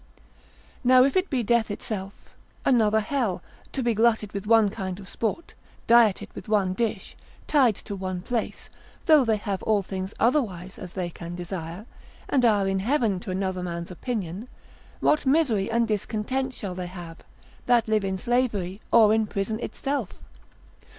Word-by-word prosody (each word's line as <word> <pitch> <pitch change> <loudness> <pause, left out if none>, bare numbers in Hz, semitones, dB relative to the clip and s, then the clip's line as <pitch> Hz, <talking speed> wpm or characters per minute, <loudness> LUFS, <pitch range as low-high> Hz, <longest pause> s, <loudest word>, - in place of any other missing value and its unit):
Now 255 0 +7
if 275 - +1
it 375 0 +2
be 255 -5 0
death 230 0 +2
itself, 205 -1 -6 0.3
another 220 -4 +4
hell, 215 -7 -1 0.3
to 265 - -2
be 235 -1 +2
glutted 220 -2 +2
with 200 0 -5
one 220 -3 +5
kind 190 -3 -5
of 195 - -10
sport, 230 +11 -3 0.3
dieted 230 -4 +4
with - - -9
one 200 -4 +2
dish, 220 -1 -3 0.3
tied 260 -8 +4
to 200 - -6
one 185 -2 -4
place; 235 0 -3 0.3
though 310 -4 +6
they 225 -3 +2
have 200 -3 -3
all 210 -2 +1
things 190 +1 -5
otherwise 200 - 0
as 180 -2 -8
they 175 -2 -3
can 170 +1 -8
desire, 175 +1 -6 0.4
and 260 - +2
are 205 -4 +3
in 195 0 0
heaven 225 -3 +1
to 185 - -9
another 185 0 -2
man's 170 0 -5
opinion, 200 0 -4 0.5
what 300 -2 +2
misery 265 -9 +2
and 230 0 +2
discontent 230 +5 -2
shall 195 -3 -5
they 180 0 -5
have, 175 -2 -9 0.5
that 240 -2 +4
live 215 -1 +2
in 190 -1 -1
slavery, 210 -4 -1
or 215 -2 +6
in 220 -1 +2
prison 205 +2 -2
itself? 270 -4 -4
210 Hz, 165 wpm, -25 LUFS, 190-235 Hz, 0.5 s, Now